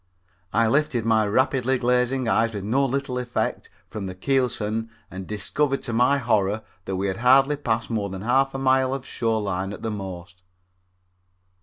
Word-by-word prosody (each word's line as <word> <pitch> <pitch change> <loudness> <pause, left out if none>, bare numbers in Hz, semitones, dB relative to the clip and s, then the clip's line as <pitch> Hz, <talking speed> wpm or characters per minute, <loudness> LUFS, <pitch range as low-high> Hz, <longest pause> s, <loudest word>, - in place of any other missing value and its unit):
I 115 - +3
lifted 140 -2 +1
my 110 -2 +3
rapidly 130 +3 +1
glazing 125 +1 +1
eyes 115 0 +2
with 100 - -4
no 125 +7 +1
little 135 -1 -2
effort 125 -1 -3 0.2
from 105 -3 -6
the 95 - -6
keelson 115 -1 -1 0.2
and 95 0 -7
discovered 135 +7 -1
to 120 - -4
my 125 +5 +3
horror 110 -4 +1 0.2
that 95 - -3
we 95 +1 -1
had 95 -1 -2
hardly 135 +4 +5
passed 115 -5 -2
more 105 -3 -1
than 95 0 -6
half 135 +3 +2
a - - -1
mile 130 0 +2
of 135 -1 -7
shore 115 -4 -1
line 95 -1 -2
at - - -10
the 110 - -2
most. 90 -3 -7
115 Hz, 175 wpm, -24 LUFS, 105-130 Hz, 0.2 s, hardly